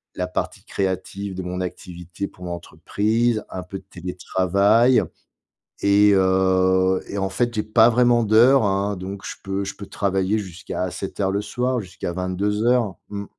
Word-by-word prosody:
la 90 - -2
partie 90 - -4
créative 95 0 -3
de 95 - -4
mon 90 +1 -4
activité 90 +1 -6
pour 90 - -12
l'entreprise, 110 +6 -1
un 90 - -5
peu 90 +2 -7
de - - -23
télétravail 100 +6 +2 0.8
et 100 +1 +5
heu, 95 0 +3
et 100 - -4
en 95 0 0
fait 120 +4 -1
j'ai 105 - 0
pas 110 +1 +5
vraiment 120 0 +4
d'heures 120 +5 +5
hein, 100 0 0
donc 95 +2 -7
je - - -5
peux 95 0 -2
je 95 - -5
peux 100 - -9
travailler 95 +1 0
jusqu'à 95 -3 -5
assez 95 +1 -4
tard 95 -1 -1
le 100 +1 -1
soir, 125 +1 -1
jusqu'à 90 -2 -6
22:00. 105 +5 0
Mmh. 100 0 -5
100 Hz, 160 wpm, -22 LUFS, 95-105 Hz, 0.8 s, et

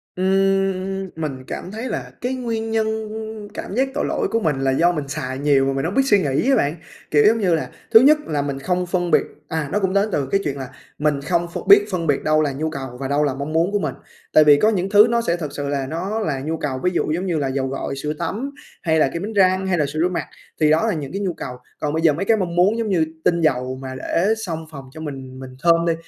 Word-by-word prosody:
Ừm, 195 0 +1
mình 140 -5 -4
cảm 185 - -6
thấy 225 +4 -5
là - - -4
cái 250 +2 -1
nguyên 225 -3 -3
nhân 220 -1 +1 0.7
cảm 205 - -6
giác 265 +2 +2
tội 295 - -1
lỗi - - -1
của 230 - +2
mình 150 -8 0
là 135 0 +1
do 170 +6 +3
mình 150 -4 -4
xài 130 -1 -4
nhiều 140 -1 +3
mà 135 - 0
mình 135 +3 -2
hông 180 - -2
biết 270 - +5
suy 205 -6 +4
nghĩ 145 - 0
á 270 - +5
bạn. 145 - +1 0.4
Kiểu 145 -1 +5
giống 225 +2 +5
như 180 -5 +2
là, 155 - -3 0.2
thứ 225 - +10
nhất 295 +4 +6
là 145 -2 0
mình 140 -1 -3
không 180 +3 -1
phân 175 -1 -1
biệt - - +5 0.2
à, 160 -3 -3
nó 205 - +1
cũng 190 -1 0
đến 200 +2 +2
từ 140 - 0
cái 195 +7 +1
chuyện 140 -2 -2
là 130 -2 -6 0.3
mình 145 -2 +1
không 170 +2 0
ph 170 - -6
biết 200 +1 +8
phân 170 -3 -2
biệt 145 -2 +1
đâu 155 0 +3
là 145 - 0
nhu 155 +3 -2
cầu 135 -4 -6
và 135 - -3
đâu 145 +2 +1
là 140 -3 +1
mong 140 +3 -5
muốn 170 +4 +2
của 205 - +1
mình. 150 -6 -2 0.4
Tại 155 - +7
vì 145 -1 +7
có 215 - +4
những 195 -3 -1
thứ 210 +2 +7
nó 235 0 +2
sẽ 170 -5 0
thật 155 -3 -4
sự 145 -1 -4
là 140 -2 -2
nó 185 +8 -3
là 150 -11 -1
nhu 160 +4 -3
cầu, 135 -4 -3
ví 180 - +2
dụ 155 - 0
giống 175 +4 -1
như 175 -4 0
là 140 -2 0
dầu 135 0 -1
gội, 135 +1 -4
sữa 150 +2 -3
tắm 260 +7 -3 0.3
hay 160 -2 +2
là 135 - +4
kem 170 +3 -3
đánh 220 +1 -4
răng 190 -1 +3
hay 180 -2 +1
là 150 - +2
sữa 155 +3 -4
rửa 180 +2 +2
mặt, 180 - -3 0.4
thì 155 - +5
đó 155 +1 +3
là - - +1
những 145 -4 -5
cái 195 +2 -3
nhu 185 -3 -1
cầu. 125 - -6 0.2
Còn 150 0 -2
bây 160 - 0
giờ 160 -2 +5
mấy 175 +7 -3
cái 225 +1 +3
mong 175 -3 -2
muốn, 195 +6 +3
giống 225 -2 -1
như 165 -4 +2 0.2
tinh 170 -1 +2
dầu 130 -4 0
mà 130 -1 -6
để 185 +10 +1
xông 160 -3 -4
phòng 140 -2 -9
cho 160 - -10
mình 135 -3 -7
mình 130 -1 -9
thơm 170 0 +4
đi, 165 - +3
165 Hz, 285 wpm, -21 LUFS, 140-195 Hz, 0.7 s, thứ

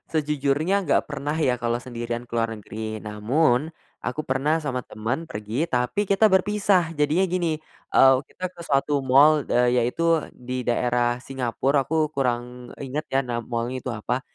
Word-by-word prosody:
Sejujurnya 150 +3 +1
nggak - - +3
pernah 145 +1 -3
ya, 125 -4 +2
kalau 120 0 -1
sendirian 120 -1 -5
ke - - -32
luar 115 -1 0
negeri. 110 0 -6
Namun, 120 +8 +1 0.3
aku 125 +6 -2
pernah 150 +4 0
sama 130 -4 -3
temen 120 +9 -3
pergi, 110 +4 -3
tapi 125 +9 0
kita 200 +2 +4
berpisah. 190 -3 +2
Jadinya 155 +5 +2
gini, 175 -3 0 0.4
eee, 135 0 +7
kita 185 - -9
ke 170 - -14
suatu 145 -2 +1
mall, 140 +4 +5
eee, 125 0 +3
yaitu 165 +7 +2 0.2
di 125 +1 -4
daerah 120 0 +1
Singapore, 135 +1 -1
aku 155 -1 +1
kurang 125 -2 -2
inget 140 +3 -4
ya, 135 0 +2
nama 120 -1 -2
mall-nya 120 +2 -3
itu 130 - -4
apa. 120 +3 -2
135 Hz, 160 wpm, -24 LUFS, 120-155 Hz, 0.4 s, eee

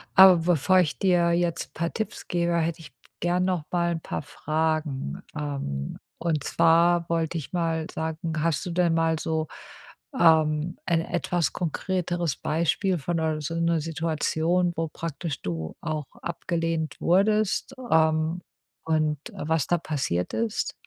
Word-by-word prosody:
aber 190 -2 +9
bevor 175 +2 +3
ich 160 -5 0
dir 175 -3 +3
jetzt 170 -1 -1
paar 170 +1 -2
Tipps 220 - -4
gebe, 170 -1 +1
hätte 165 0 -1
ich 165 - -12 0.3
gern 175 +1 +1
noch 180 -5 -1
mal 170 -1 +1
'n - - -4
paar - - -4
Fragen. 155 - -2
Ähm, 135 - -4 0.2
und 160 -4 0
zwar 170 +2 +4
wollte 165 0 0
ich 155 - -7
mal 165 -2 0
sagen, 160 0 -3
hast 165 -1 0
du 180 - -3
denn 170 -1 +2
mal 165 -1 +2
so, 160 0 -1 0.7
ähm, 160 0 +4
ein 165 -1 +2
etwas 175 0 -1
konkreteres 175 -2 -1
Beispiel 170 +4 0
von 170 +4 -2
'ner 155 -1 0
so 155 +3 -3
'ner 165 -1 +1
Situation, 165 +2 0
wo 165 0 0
praktisch 165 -2 -5
du 80 -3 -4
auch 155 -3 -3 0.2
abgelehnt 165 -1 -2
wurdest, 210 +7 +2 0.2
ähm, 160 +1 +3 0.4
und, 155 -2 +1
äh, 150 - -6
was 160 -4 +1
da 175 - +3
passiert 135 - -2
ist? 225 -2 -1
165 Hz, 145 wpm, -26 LUFS, 155-175 Hz, 0.7 s, aber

